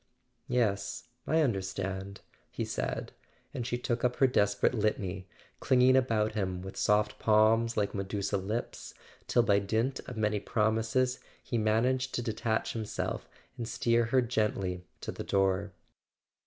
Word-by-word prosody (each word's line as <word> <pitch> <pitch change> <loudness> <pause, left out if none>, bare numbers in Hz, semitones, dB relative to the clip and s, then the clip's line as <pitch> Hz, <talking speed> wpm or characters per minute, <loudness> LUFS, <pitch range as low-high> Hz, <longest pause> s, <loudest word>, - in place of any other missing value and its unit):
"Yes, 105 -5 -1 0.2
I 160 +1 +3
understand," 95 -4 -2 0.3
he - - -3
said; - - -3 0.4
and 120 - -3
she 120 - -1
took 120 -1 -2
up 125 0 +2
her 135 - +4
desperate 100 -5 +2
litany, 100 -4 -1 0.3
clinging 130 0 +4
about 115 -5 +2
him 95 -4 -2
with 95 - -8
soft 105 0 +2
palms 110 +2 +3
like 105 -1 +1
medusa 100 0 -2
lips, 105 +5 -4 0.3
till 120 - +4
by 100 -3 +4
dint 110 +6 0
of 125 -3 -7
many 105 -1 +1
promises 115 +5 +1 0.2
he 120 - -1
man¬ 110 +2 +2
aged 130 0 0
to 120 - -1
detach 110 -1 -1
himself 110 -2 -4 0.3
and 115 - -3
steer 115 0 +2
her 125 +2 +3
gently 100 -6 -1 0.2
to - - -4
the - - -6
door. 95 0 +1
110 Hz, 145 wpm, -30 LUFS, 100-120 Hz, 0.4 s, her